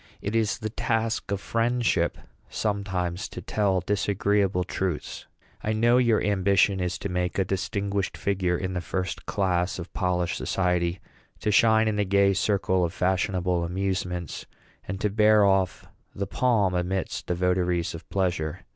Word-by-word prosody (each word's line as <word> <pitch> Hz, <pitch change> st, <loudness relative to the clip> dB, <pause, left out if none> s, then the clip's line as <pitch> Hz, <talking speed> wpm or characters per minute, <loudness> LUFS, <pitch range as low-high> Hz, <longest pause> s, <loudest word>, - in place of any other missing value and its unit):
It 100 Hz, +3 st, -3 dB
is 110 Hz, -2 st, +1 dB
the 110 Hz, -2 st, -5 dB
task 115 Hz, -1 st, -1 dB
of 100 Hz, -1 st, -1 dB
friendship, 115 Hz, -4 st, 0 dB, 0.3 s
sometimes, 95 Hz, -4 st, -2 dB
to -, -, -7 dB
tell 100 Hz, -3 st, 0 dB
disagreeable 100 Hz, -1 st, +1 dB
truths. 90 Hz, -3 st, -4 dB, 0.4 s
I 110 Hz, -, 0 dB
know 120 Hz, +3 st, +4 dB
your 120 Hz, -3 st, +3 dB
ambition 100 Hz, -1 st, +3 dB
is 90 Hz, -1 st, -1 dB
to -, -, -4 dB
make 90 Hz, 0 st, -1 dB
a 95 Hz, -, +2 dB
distinguished 100 Hz, -1 st, -2 dB
figure 90 Hz, +1 st, 0 dB
in 95 Hz, +1 st, -3 dB
the 90 Hz, -, -2 dB
first 90 Hz, +2 st, -4 dB
class 90 Hz, -2 st, 0 dB
of 85 Hz, 0 st, -8 dB
polished 90 Hz, -2 st, 0 dB
society, 90 Hz, -1 st, 0 dB, 0.4 s
to 105 Hz, -, +1 dB
shine 110 Hz, +1 st, +5 dB
in 105 Hz, -1 st, 0 dB
the 105 Hz, -, +2 dB
gay 100 Hz, 0 st, +3 dB
circle 95 Hz, -1 st, +1 dB
of 85 Hz, 0 st, -1 dB
fashionable 90 Hz, -2 st, 0 dB
amusements, 90 Hz, -1 st, -3 dB, 0.4 s
and 95 Hz, +1 st, -4 dB
to 105 Hz, -, +1 dB
bear 105 Hz, 0 st, +5 dB
off 95 Hz, -2 st, +1 dB, 0.3 s
the 100 Hz, -, -2 dB
palm 105 Hz, -3 st, +1 dB
amidst 90 Hz, +1 st, -2 dB
the 90 Hz, -, 0 dB
votaries 90 Hz, -1 st, 0 dB
of 85 Hz, -, -10 dB
pleasure. 90 Hz, -3 st, -1 dB
95 Hz, 155 wpm, -26 LUFS, 90-105 Hz, 0.4 s, shine